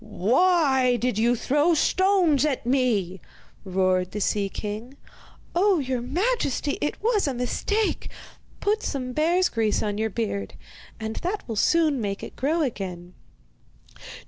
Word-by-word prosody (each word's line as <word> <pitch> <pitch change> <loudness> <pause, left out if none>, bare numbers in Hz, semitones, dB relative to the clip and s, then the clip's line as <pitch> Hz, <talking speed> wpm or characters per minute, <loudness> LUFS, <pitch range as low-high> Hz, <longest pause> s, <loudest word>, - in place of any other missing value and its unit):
'Why 265 - +2
did 240 -3 -1
you 240 +2 +3
throw 295 +8 +2
stones 365 -4 +3
at 285 -6 -1
me?' 225 -8 0 0.4
roared 185 -1 0
the 210 - -3
sea 200 0 0
king. 215 +7 -6 0.6
'Oh, 380 +2 +3
your 260 -4 -2
majesty, 295 - -1
it 295 - -2
was 435 -7 +2
a 270 - -2
mistake! 410 - -1 0.5
Put 425 +2 +1
some 255 -2 -3
bear's 345 +5 +2
grease 225 -6 0
on 205 -1 -2
your 220 0 0
beard 190 - -3 0.4
and 220 0 -5
that 390 +4 -3
will 225 - -4
soon 305 +3 +2
make 200 -2 -3
it - - -8
grow 310 +5 0
again. 185 -8 -5
255 Hz, 140 wpm, -25 LUFS, 210-330 Hz, 0.6 s, you